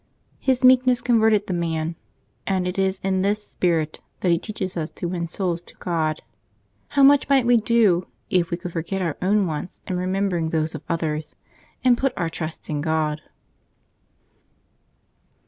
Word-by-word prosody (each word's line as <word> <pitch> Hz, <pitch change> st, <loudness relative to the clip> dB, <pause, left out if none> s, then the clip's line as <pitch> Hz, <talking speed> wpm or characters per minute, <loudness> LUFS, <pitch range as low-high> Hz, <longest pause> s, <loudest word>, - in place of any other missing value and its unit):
His 260 Hz, -2 st, +1 dB
meekness 255 Hz, -1 st, +6 dB
converted 220 Hz, -4 st, +3 dB
the 190 Hz, -, -3 dB
man, 165 Hz, -1 st, -2 dB, 0.5 s
and 185 Hz, -2 st, 0 dB
it 180 Hz, +2 st, -3 dB
is 190 Hz, 0 st, +1 dB
in 190 Hz, -1 st, +1 dB
this 205 Hz, +2 st, 0 dB
spirit 160 Hz, -4 st, 0 dB, 0.2 s
that 180 Hz, -, +2 dB
he 170 Hz, -, +3 dB
teaches 190 Hz, -3 st, -5 dB
ns 160 Hz, -2 st, -2 dB
to 175 Hz, -, -3 dB
win 170 Hz, -1 st, -3 dB
souls 175 Hz, -1 st, -2 dB
to -, -, -16 dB
God. 160 Hz, -3 st, -2 dB, 0.6 s
How 280 Hz, -, +2 dB
much 280 Hz, 0 st, +6 dB
might 270 Hz, -3 st, +4 dB
we 240 Hz, 0 st, +5 dB
do 215 Hz, -6 st, +3 dB, 0.2 s
if 175 Hz, -2 st, +1 dB
we 170 Hz, -, -2 dB
could 175 Hz, -1 st, -7 dB
forget 180 Hz, +3 st, -2 dB
our 165 Hz, -4 st, -1 dB
own 200 Hz, +2 st, +3 dB
wants 160 Hz, +1 st, -5 dB
in 185 Hz, -, -2 dB
remem 190 Hz, +2 st, 0 dB
bering 170 Hz, -4 st, -1 dB
those 160 Hz, 0 st, -1 dB
of -, -, -6 dB
others, 155 Hz, -2 st, -2 dB, 0.5 s
and 250 Hz, -2 st, +4 dB
put 270 Hz, -1 st, +1 dB
our 165 Hz, -, -1 dB
trust 160 Hz, -1 st, -6 dB
in 150 Hz, -2 st, -2 dB
(rod 155 Hz, -1 st, 0 dB
180 Hz, 170 wpm, -23 LUFS, 165-210 Hz, 0.6 s, meekness